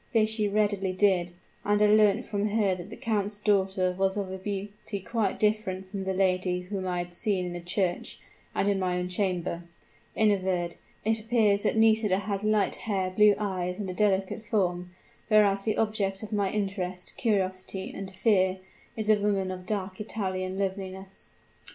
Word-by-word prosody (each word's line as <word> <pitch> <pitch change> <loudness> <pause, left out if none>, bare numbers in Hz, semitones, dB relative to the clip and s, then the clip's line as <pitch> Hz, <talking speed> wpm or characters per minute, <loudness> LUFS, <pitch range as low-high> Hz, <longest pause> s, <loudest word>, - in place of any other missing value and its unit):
This 220 -1 +3
she 215 -2 0
readily 205 -2 +1
did, 185 -3 +2 0.3
and 205 0 +2
I 210 - +5
learnt 210 +2 +4
from 205 -1 -1
her 205 -2 +2
that 180 +1 -7
the - - -8
count's 205 -2 -2
daughter 190 -3 +1
was 190 +1 +1
of 195 -2 -3
a 190 - -5
beauty 200 +1 -5
quite 205 0 -1
different 195 -3 0
from 195 -2 -4
the 190 - 0
lady 185 -1 +1
whom 185 0 -4
I 180 -1 -1
had 175 0 -4
seen 185 0 -1
in 175 - -4
the 175 - -5
church 175 +1 -2 0.4
and 195 - +1
in 200 -1 +2
my 180 -1 0
own 180 0 -2
chamber. 180 -2 -1 0.5
In 215 -1 +4
a 200 - +3
word, 180 -2 -2 0.3
it 220 0 +3
appears 215 -3 +2
that - - 0
Nisida 220 -3 +4
has 200 0 -3
light 215 -2 +2
hair, 190 -4 -2
blue 210 +2 +5
eyes 185 -3 -2
and 195 -3 -3
a - - -5
delicate 195 +1 +1
form: 180 -5 0 0.4
whereas, 205 -3 +4
the 215 +1 -1
object 210 -2 0
of 215 - -6
my 200 -2 +1
interest, 190 -3 -3
curiosity, 190 -3 -1
and 195 -1 -5
fear, 190 -1 +2 0.4
is 215 -1 -1
a 215 -1 +5
woman 195 -2 +1
of 185 0 -8
dark 195 -2 -3
Italian 185 -3 -3
loveliness. 190 0 -4
195 Hz, 180 wpm, -28 LUFS, 185-210 Hz, 0.5 s, I